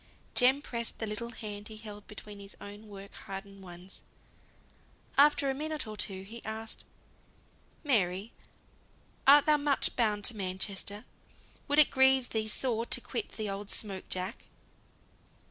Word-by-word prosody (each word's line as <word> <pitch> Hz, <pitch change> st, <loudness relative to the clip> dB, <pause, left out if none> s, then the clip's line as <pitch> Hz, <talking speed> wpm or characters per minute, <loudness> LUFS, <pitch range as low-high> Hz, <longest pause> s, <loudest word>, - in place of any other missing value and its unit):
Jem 265 Hz, +3 st, +5 dB
pressed 235 Hz, -4 st, -4 dB
the 220 Hz, -, -2 dB
little 220 Hz, +2 st, -4 dB
hand 210 Hz, -3 st, -6 dB
he 220 Hz, -, -9 dB
held 210 Hz, -2 st, -9 dB
between 210 Hz, -1 st, -10 dB
his 200 Hz, 0 st, -11 dB
own 205 Hz, +2 st, -10 dB
work 200 Hz, -1 st, -10 dB
hardened 195 Hz, 0 st, -8 dB
ones. 180 Hz, 0 st, -12 dB, 1.1 s
After 285 Hz, 0 st, +5 dB
a 270 Hz, -, +2 dB
minute 305 Hz, +2 st, -2 dB
or 215 Hz, -1 st, -7 dB
two, 190 Hz, -2 st, +2 dB
he 225 Hz, +4 st, -9 dB
asked, 220 Hz, 0 st, -5 dB, 1.0 s
"Mary, 200 Hz, -, +1 dB, 0.9 s
art 290 Hz, +1 st, +9 dB
thou 305 Hz, -1 st, +5 dB
much 285 Hz, -1 st, +2 dB
bound 210 Hz, -4 st, +1 dB
to 240 Hz, -, +1 dB
Manchester? 195 Hz, +1 st, -2 dB, 0.6 s
Would 290 Hz, -, +1 dB
it 305 Hz, -, +7 dB
grieve 265 Hz, -1 st, +5 dB
thee 220 Hz, -1 st, -1 dB
sore 230 Hz, +1 st, 0 dB
to -, -, +2 dB
quit 420 Hz, -, -4 dB
the 215 Hz, -2 st, -3 dB
old 200 Hz, +1 st, -4 dB
smoke 195 Hz, -3 st, -2 dB
jack?" 185 Hz, +4 st, -4 dB
215 Hz, 145 wpm, -31 LUFS, 200-260 Hz, 1.1 s, art